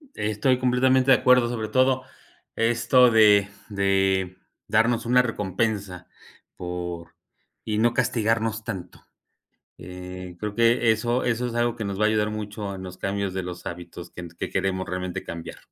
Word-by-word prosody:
Estoy 110 +5 +1
completamente 130 +1 +3
de 130 - +7
acuerdo 125 -2 +4
sobre 110 -3 -3
todo 130 0 +2 0.5
esto 120 +2 +4
de 105 -2 +5 0.2
de 95 -2 +1 0.3
darnos 115 +2 +2
una 125 +1 +5
recompensa 100 -4 -2 0.5
por 90 -1 -6 0.5
y 105 -1 -1
no 120 +2 +3
castigarnos 115 -2 0
tanto, 90 -5 -7 0.7
eh, 90 0 -9
creo 105 +1 -4
que 115 0 +3
eso 120 +3 0
eso 120 +1 0
es 120 - -5
algo 120 0 0
que 110 - -4
nos 100 0 -4
va 105 - +3
a - - +5
ayudar 105 -1 +1
mucho 105 -1 -5
en 95 - -8
los 90 -1 -9
cambios 100 -1 -2
de 95 - -2
los 90 -1 -7
hábitos 85 0 -8
que 90 -1 -8
que - - -4
queremos 95 -1 -1
realmente 90 -1 -4
cambiar. 85 -1 -7
105 Hz, 155 wpm, -24 LUFS, 95-120 Hz, 0.7 s, de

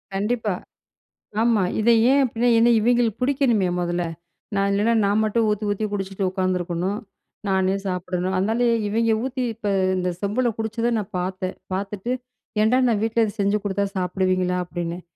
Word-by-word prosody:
கண்டிப்பா. 210 0 0 0.9
ஆமா. 230 -4 +3 0.2
இதை 235 +2 +4 0.2
ஏன் 280 - +5
அப்டின்னா, 240 0 0
ஏன்னா 235 +1 +5
இவைங்களுக்கு 235 -1 +2
புடிக்கணுமே 250 -8 +2
மொதல்ல. 175 0 -1 0.5
நான், 195 0 +2
இல்லைன்னா, 215 +4 +2
நான் 205 +2 +2
மட்டும் 220 +1 +1
ஊத்தி 210 0 -1
ஊத்தி 205 +1 -1
குடிச்சிட்டு 195 -1 -3
உக்காந்துருக்கணும். 185 +1 -1 0.5
நானே 190 0 +2
சாப்பிடணும். 180 0 -2
அதுனால 220 +6 +1 0.2
இவய்ங்க 225 +2 +2
ஊத்தி 260 -1 -2
இப்ப 220 -1 -4 0.3
இந்த 180 0 -1
செம்புல 215 +5 0
குடிச்சத 230 +2 -1
நான் 205 -3 -4
பாத்தேன். 185 +1 -3 0.2
பாத்துட்டு 200 +4 -3 0.5
"ஏன்டா 230 +4 +4
நான் 220 -3 +1
வீட்ல 225 +1 +2
இத 210 - -3
செஞ்சு 200 +1 +2
குடுத்தா 200 0 0
சாப்பிடுவீங்களா?" 185 0 0
அப்டின்னேன் 175 0 -5
205 Hz, 145 wpm, -23 LUFS, 185-230 Hz, 0.9 s, ஏன்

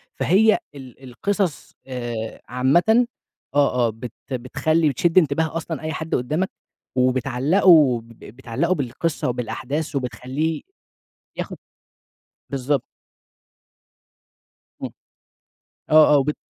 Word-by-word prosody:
فهي 215 +5 +4 0.2
ال 135 -1 -12
القصص، 175 - -2
آآ، 120 -3 -5
عامةً 175 - +3 0.5
آه، 125 -4 +3
آه، - - 0
بت 115 +1 -8 0.2
بتخلي 155 +6 +1
بتشد 165 +6 0
انتباه 160 -1 +3
أصلًا 165 -2 -5
أي 155 0 -3
حد 160 0 -2
قدامك، 155 +10 -1 0.5
وبتعلّقه 130 - +4
ب 115 - -19
بتعلّقه 130 - -2
بالقصة 140 +2 -2
وبالأحداث 135 +5 -3
وبتخلّيه 135 +4 -2 0.8
ياخد - - -5 0.9
بالضبط. 135 0 0 2.0
امم. - - -3 1.0
آه، 155 0 +7
آه - - +6
وبت 145 +2 0
140 Hz, 100 wpm, -22 LUFS, 125-160 Hz, 2.0 s, آه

